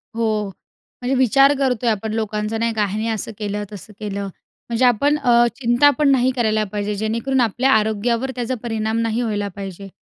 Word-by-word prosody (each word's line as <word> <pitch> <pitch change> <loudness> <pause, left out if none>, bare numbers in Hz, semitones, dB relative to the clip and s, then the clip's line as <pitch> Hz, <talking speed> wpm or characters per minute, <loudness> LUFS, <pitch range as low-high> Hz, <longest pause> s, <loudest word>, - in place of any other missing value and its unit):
हो, 215 -2 0 0.5
म्हणजे 250 +2 0
विचार 270 +2 +5
करतोय 250 -3 +1
आपण 215 0 -2
लोकांचा, 215 0 -2
नाही 230 0 0
का, 215 -1 +1
ह्याने 210 +3 -3
असं 220 0 -3
केलं, 210 -1 -3
तसं 210 +1 -10
केलं. 200 -1 -4 0.5
म्हणजे 235 +2 +2
आपण 280 +5 +3
अ, 240 -4 +4
चिंता 240 +3 +4
पण 295 - +4
नाही 260 -1 +3
करायला 220 -3 +1
पाहिजे 210 0 -2
जेणेकरून 230 +5 0
आपल्या 245 +4 +2
आरोग्यावर 225 +3 +1
त्याचा 245 +1 -2
परिणाम 220 -1 -2
नाही 230 +1 -1
व्हायला 205 -3 -1
पाहिजे. 195 -1 -7
225 Hz, 175 wpm, -20 LUFS, 210-245 Hz, 0.5 s, विचार